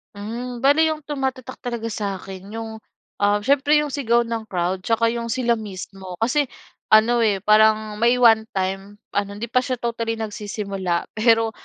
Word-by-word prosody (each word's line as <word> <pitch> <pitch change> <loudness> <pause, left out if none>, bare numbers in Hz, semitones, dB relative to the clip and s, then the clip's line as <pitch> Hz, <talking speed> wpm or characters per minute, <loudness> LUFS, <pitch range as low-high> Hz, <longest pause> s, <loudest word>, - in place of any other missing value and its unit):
Hmm, 235 +4 -6
bale 300 +4 +5
'yong 310 -1 -3
tumatatak 265 -3 -4
talaga 235 -2 -4
sa’kin 195 -2 -5
'yong, 220 +1 -7 0.4
um, 205 0 +3
siyempre 285 +3 +3
'yong 300 -1 +1
sigaw 240 -4 +2
ng 230 -1 -4
crowd 180 -1 -1
tsaka 230 +4 +1
'yong 235 0 -3
sila 235 -2 0
mismo. 190 -2 -8
Kasi 280 +4 +2 0.4
ano 225 +3 +5
eh, 205 -4 +1
parang 215 0 +3
may 240 +2 +4
one-time 205 -4 +2 0.2
ano, 205 0 -1
hindi 225 +3 -6
pa 255 - +4
siya 255 0 -2
totally 230 -1 -2
nagsisimula 200 -4 -3
pero, 225 0 +3
225 Hz, 155 wpm, -22 LUFS, 205-240 Hz, 0.4 s, bale